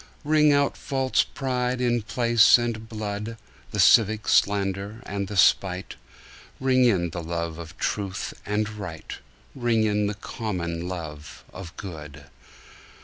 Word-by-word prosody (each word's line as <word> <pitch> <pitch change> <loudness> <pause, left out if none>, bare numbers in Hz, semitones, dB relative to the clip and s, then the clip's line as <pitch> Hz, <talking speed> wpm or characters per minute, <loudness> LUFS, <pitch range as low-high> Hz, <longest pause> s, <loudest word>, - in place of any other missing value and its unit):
Ring 150 0 +4
out 140 -1 +2
false 135 -1 +1
pride 125 -2 -2
in 120 -1 +1
place 115 +1 +5
and 115 -2 -4
blood, 105 +1 -5 0.3
The 105 - -4
civic 105 +3 +5
slander 100 +2 +1
and 100 -1 -3
the 100 - -5
spite; 95 0 +3 0.7
Ring 130 -1 +3
in 90 -8 +2
the 85 - -5
love 85 0 -4
of 85 +1 -10
truth 100 -2 -3
and 105 +1 -1
right, 100 -7 -7 0.3
Ring 120 -4 +1
in 105 -1 +1
the 105 - -3
common 90 -6 -4
love 80 -5 -7
of 90 -2 -9
good. 75 -6 -8
105 Hz, 135 wpm, -25 LUFS, 90-120 Hz, 0.7 s, place